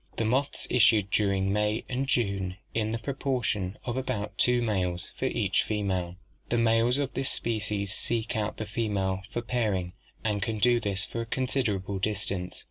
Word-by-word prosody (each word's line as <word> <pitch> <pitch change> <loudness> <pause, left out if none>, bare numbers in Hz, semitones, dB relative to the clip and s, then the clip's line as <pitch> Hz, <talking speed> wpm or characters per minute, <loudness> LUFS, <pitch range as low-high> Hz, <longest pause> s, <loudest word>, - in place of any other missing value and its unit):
The 115 - +1
moths 130 +5 0
issued 110 -4 +5
during 100 -2 +2
May 105 +1 +1
and 130 +2 -1
June 100 -7 0 0.2
in 110 -1 0
the 115 - -1
proportion 115 -7 -1
of 120 0 -2
about 110 -6 -2
two 125 +3 +4
males 90 -5 -1
for - - -3
each - - +2
female. 95 -4 -1 0.3
The 120 - +2
males 115 +2 +4
of 140 -2 -1
this 135 +1 +1
species 105 -3 -1
seek 115 0 -1
out 110 -1 -1
the 110 - -3
female 100 -4 -1
for 120 - -3
pairing 105 -7 0 0.3
and 105 -2 0
can 110 +2 -1
do 120 +3 +4
this 100 -3 -1
for 115 - -4
a - - -3
considerable 110 -7 -1
distance. 95 -3 -1
110 Hz, 170 wpm, -28 LUFS, 100-120 Hz, 0.3 s, issued